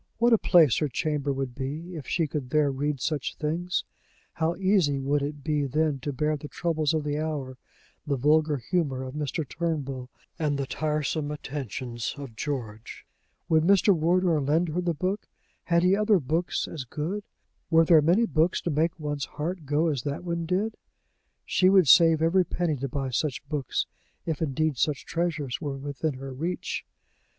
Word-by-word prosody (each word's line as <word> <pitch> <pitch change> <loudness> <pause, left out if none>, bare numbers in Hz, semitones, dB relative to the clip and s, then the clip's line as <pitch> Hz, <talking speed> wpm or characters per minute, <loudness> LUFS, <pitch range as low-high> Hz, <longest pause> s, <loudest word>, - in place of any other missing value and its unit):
What 235 +1 +4
a 225 - +5
place 160 - +5
her 150 - +1
chamber 145 +2 -1
would 135 -2 -3
be, 150 +7 -5
if 150 -6 -7
she 165 - +1
could 145 -3 -4
there 150 0 +3
read 140 +1 -2
such 150 +2 -2
things! 170 +4 -1 0.5
How 165 +1 0
easy 185 -7 +2
would 140 +2 +1
it 145 0 -4
be 150 -1 0
then 150 +1 0
to 145 +3 -3
bear 150 +3 0
the 150 0 -7
troubles 160 -1 0
of 155 - 0
the 145 0 -1
hour, 145 -5 -4 0.5
the 140 - +1
vulgar 150 +3 +3
humor 135 -2 -1
of 130 0 -6
Mr. 150 +1 -3
Turnbull, 140 -6 -3 0.3
and 150 -3 0
the 140 - -1
tiresome 150 +1 -1
attentions 130 -5 -4
of 135 -5 -8
George! 115 -5 -5 0.4
Would 160 -1 +4
Mr. 195 +2 +5
Wardour 170 0 +2
lend 160 +5 +1
her 170 +4 -1
the 175 -2 -1
book? 185 +7 -2 0.4
Had 170 0 +3
he 185 +2 +5
other 210 0 +4
books 160 +5 -1
as 155 -5 -5
good? 160 - -4 0.5
Were 165 -1 +5
there 160 -2 +6
many 175 +10 +4
books 165 -4 +2
to 170 - -2
make 160 +3 0
one's 145 -2 -2
heart 160 +1 -5
go 150 +3 +2
as 145 -6 0
that 145 +5 -4
one 170 -1 -3
did? 200 +5 -1 0.7
She 185 - +3
would 190 -4 +5
save 165 +2 +6
every 180 +3 +4
penny 175 -3 -1
to 135 +1 -3
buy 135 0 -3
such 140 +2 -2
books, 145 -3 -1 0.4
if 160 -2 -2
indeed 155 -1 0
such 150 -3 0
treasures 160 -6 -2
were 140 -3 -3
within 140 +1 -3
her 135 +1 -7
reach! 165 +7 -3
150 Hz, 180 wpm, -27 LUFS, 140-170 Hz, 0.7 s, there